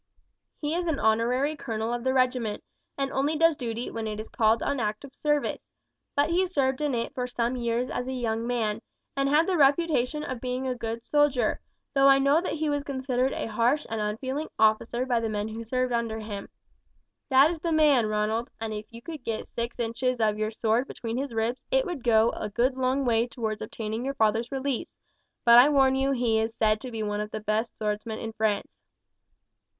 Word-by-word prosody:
"He 300 0 -2
is 350 +1 -1
an 320 -4 0
honorary 240 +7 +2
colonel 225 -4 -3
of 240 -1 -3
the 260 - +2
regiment, 250 -4 0 0.3
and 275 -1 -1
only 285 +4 0
does 330 0 +4
duty 235 -2 -4
when 225 -1 -4
it 210 0 -4
is 215 - -7
called 225 -1 +2
on 280 -1 -1
active 215 +5 -3
service; 295 0 0 0.5
but 285 +3 +2
he 370 +2 +2
served 270 -6 0
in 290 -4 0
it 230 - -3
for 250 -1 -2
some 240 0 -1
years 240 0 -1
as 250 -1 -3
a - - -2
young 230 -2 -2
man, 225 -3 -1 0.3
and 275 0 +1
had 305 +3 +4
the 370 -1 0
reputation 295 -1 +2
of 255 -5 -5
being 255 +1 -3
a 255 - 0
good 230 -1 -5
soldier, 290 -4 +2 0.3
though 275 -1 +5
I 275 0 +7
know 280 +4 +3
that 365 - -3
he 315 0 -1
was 290 -1 0
considered 260 -2 -1
a - - -3
harsh 235 +6 +1
and 225 -1 -1
unfeeling 260 +8 -3
officer 220 +3 +2
by 245 -3 +1
the 225 -1 -2
men 210 0 -2
who 225 +1 -6
served 255 +2 -1
under 230 -2 -1
him. 210 -2 -6 0.8
That 275 +4 +6
is 335 - -5
the 335 +1 -2
man, 295 -7 +4
Ronald, 215 +2 -1
and 220 -1 -3
if 210 0 -6
you 230 0 -11
could 315 -6 -8
get 225 -2 -3
six 235 +1 -5
inches 235 +2 -1
of 215 -1 +1
your 215 0 0
sword 225 +3 0
between 230 0 -5
his 275 0 -3
ribs 230 +3 -1
it - - +2
would 345 -9 -5
go 225 -1 +4
a 210 - -5
good 245 +5 +1
long 260 +1 0
way 230 0 +2
towards 220 -3 -4
obtaining 220 +1 -4
your 275 +1 -3
father's 225 +2 +1
release; 270 -2 -3 0.5
but 235 0 +9
I 265 +4 +7
warn 270 -2 +4
you 270 +1 +1
he 240 -4 +1
is 225 +1 -2
said 215 -1 +2
to 255 - -6
be 225 -2 -4
one 210 0 -2
of 210 - -4
the 215 - -5
best 215 +2 -2
swordsmen 215 +1 -3
in 225 0 -6
France." 215 -2 -1
245 Hz, 210 wpm, -27 LUFS, 225-275 Hz, 0.8 s, but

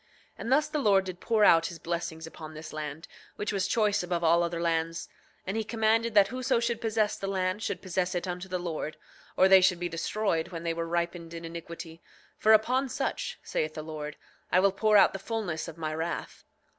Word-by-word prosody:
9:20 - - -35 0.3
And 235 - -4
thus 295 +3 +4
the 305 - -2
Lord 200 -7 +4
did 185 -1 -6
pour 225 -2 +2
out 165 -2 +6
his 170 - -7
blessings 170 -1 -4
upon 155 -1 -10
this 155 +1 -8
land, 155 +1 -6 0.3
which 210 +1 -3
was 195 -1 0
choice 210 -1 +2
above 175 -1 -2
all 170 +1 +5
other 170 0 -1
lands; 165 0 -1 0.4
and 195 - -3
he 225 - 0
commanded 225 0 +1
that 200 -1 +6
whoso 255 0 0
should 235 -1 -1
possess 220 -2 +1
the 195 - -5
land 190 +1 -1
should - - -3
possess 185 -1 -1
it 175 +1 -2
unto 180 +1 -4
the 185 - -1
Lord, 165 -3 -4 0.4
or 190 - +6
they 190 0 +8
should 180 -1 +3
be 175 - -1
destroyed 165 0 -1
when 170 -2 -7
they 165 -1 0
were 165 0 -3
ripened 170 0 -2
in 165 0 -7
iniquity; 165 0 -8 0.4
for 220 - +4
upon 255 +5 +4
such, - - -3
saith 155 0 -2
the 155 - -5
Lord: 150 -1 -6 0.3
I 180 - +5
will 195 +1 +4
pour 210 +2 +4
out - - +6
the 195 - -4
fulness 195 -7 -3
of 165 -1 -9
my 155 -1 -3
wrath. 165 +2 -4
180 Hz, 220 wpm, -29 LUFS, 165-210 Hz, 0.4 s, they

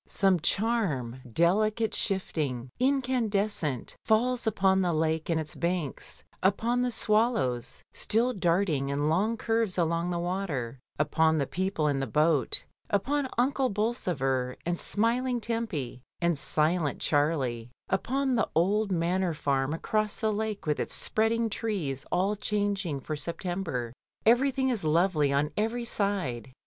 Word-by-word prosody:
Some 195 -3 +2
charm, 165 - 0
delicate, 210 - +2
shifting, 145 - -1
incandescent, 220 - 0
falls 245 +2 +2
upon 190 -2 +3
the 175 -2 +1
lake, 160 +1 0
and 165 -1 +2
its 155 -1 -5
banks, 170 -5 -3 0.2
upon 230 +6 +2
the 250 - +1
swallows 215 - 0
still 235 +4 +1
darting 170 - +1
in 145 +2 0
long 210 +8 +1
curves 225 -4 0
along 170 0 +1
the 175 - -1
water, 170 -9 -3 0.2
upon 160 +2 +2
the 140 - +1
people 185 -1 -1
in 140 -2 +1
the 135 - -2
boat, 150 +1 +1 0.2
upon 265 +7 0
Uncle 265 +1 +2
Bolsover 145 - -1
and 175 0 -1
smiling 240 +3 0
Tempy, 215 - -3 0.2
and 170 -1 +2
silent 155 +1 0
Charlie; 140 -6 0 0.2
upon 265 +7 0
the 225 -3 +1
old 200 +5 +2
Manor 175 0 0
Farm 135 -1 0
across 210 +6 -1
the 220 -1 +1
lake 215 -1 -3
with 150 -1 0
its - - -3
spreading 225 +1 +1
trees 190 - -3
all 190 +4 +1
changing 200 -8 -1
for 155 - -4
September. 165 -6 -3 0.3
Everything 265 +3 +3
is 230 -7 -1
lovely 155 -2 +2
on 140 +2 +1
every 225 +3 -1
side. 190 - -2
185 Hz, 135 wpm, -28 LUFS, 150-220 Hz, 0.3 s, upon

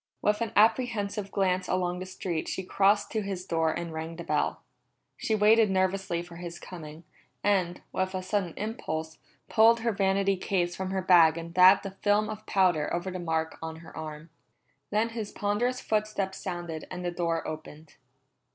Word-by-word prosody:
With 210 +2 +1
an 230 -3 -1
apprehensive 215 -2 +2
glance 185 -2 +1
along 180 -1 0
the 185 - -6
street 180 -3 -3
she 190 - -3
crossed 200 +2 +2
to 220 - 0
his 195 -3 -4
door 165 -3 +1
and 170 0 -4
rang 160 +1 -5
the 170 - -7
bell. - - -1 0.5
She 220 - -1
waited 215 +1 +5
nervously 190 -2 0
for 175 -1 -12
his 175 0 -7
coming, 160 -3 -10 0.4
and, 185 -4 +1
with 185 0 -1
a 185 - -3
sudden 185 -3 -1
impulse, 160 -7 -4 0.3
pulled 230 +1 +5
her 230 0 +1
vanity 195 -1 +1
case 180 -2 -1
from 190 0 -3
her 190 -1 -2
bag 170 -3 +6
and 170 0 -7
dabbed 185 +3 +7
a 195 - -4
film 205 +2 +1
of 215 0 -9
powder 180 -6 +2
over 175 +2 -2
the 185 - -5
mark 160 -2 -2
on 160 0 -5
her - - -13
arm. 155 0 -7 0.6
Then 215 +2 +1
his 225 -3 -5
ponderous 235 +5 0
footsteps 210 -3 -1
sounded 175 -4 -5
and 180 0 -6
the 175 - 0
door 170 -1 -1
opened. 155 0 -9
185 Hz, 180 wpm, -28 LUFS, 170-205 Hz, 0.6 s, dabbed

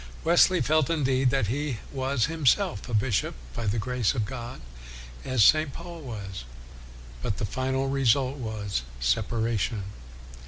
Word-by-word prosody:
Wesley 175 +2 +5
felt, 155 -3 +2
indeed, 135 -5 +2
that 135 -3 +1
he 135 +3 -2 0.2
was 130 -3 +1
himself 140 -8 +1
a - - -6
bishop 105 -1 +1 0.2
by 110 - -3
the 105 +3 +1
grace 125 +1 0
of 110 -4 0
God, 120 0 -7 0.6
as 130 -4 +2
St. 155 +4 +5
Paul 170 +2 -9
was. 100 - -7 0.8
But 105 - -2
the - - -1
final 130 +5 -1
result 135 0 +2
was 105 - -3 0.2
separation. 110 - 0
130 Hz, 135 wpm, -27 LUFS, 110-140 Hz, 0.8 s, Wesley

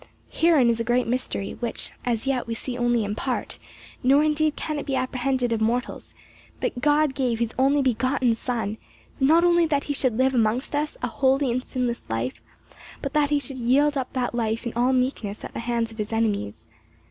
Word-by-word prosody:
Herein 320 -7 +4
is 230 - -2
a - - 0
great 240 +1 +1
mystery, 230 -4 -2
which 235 -2 -2
as 235 -1 -1
yet 265 -3 -1
we 230 - -3
see 245 +2 -4
only 240 -2 +1
in 205 0 -2
part, 250 +4 -3 0.4
nor 275 +4 +5
indeed 310 0 +1
can 305 -2 -3
it - - -7
be 270 - 0
apprehended 255 -1 0
of 220 - -1
mortals, 240 +3 -2 0.4
that 245 - -2
God 295 0 +3
gave 250 -4 0
his 235 0 -2
only 275 +2 +3
begotten 255 0 +1
Son, 225 -2 -3 0.4
not 315 +5 +5
only 345 -1 +4
that 285 -2 0
he 290 - -2
should 255 -5 0
live 265 +1 +3
amongst 235 +3 +1
us 295 +1 -1
a - - +1
holy 265 +1 +2
and 250 +2 -1
sinless 250 -3 -3
life, 115 +3 -3 0.6
but 275 0 -3
that 295 -1 +2
he 295 -1 +2
should 270 -2 -5
yield 280 +5 +3
up 260 -2 -2
that 250 -2 -1
life 225 -1 -1
in 235 - -3
all 245 +2 +2
meekness 250 -5 -1
at - - -7
the - - -4
hands 230 -1 -1
of 220 - -13
his 210 +1 -3
enemies. 210 - -1
250 Hz, 205 wpm, -24 LUFS, 230-275 Hz, 0.6 s, nor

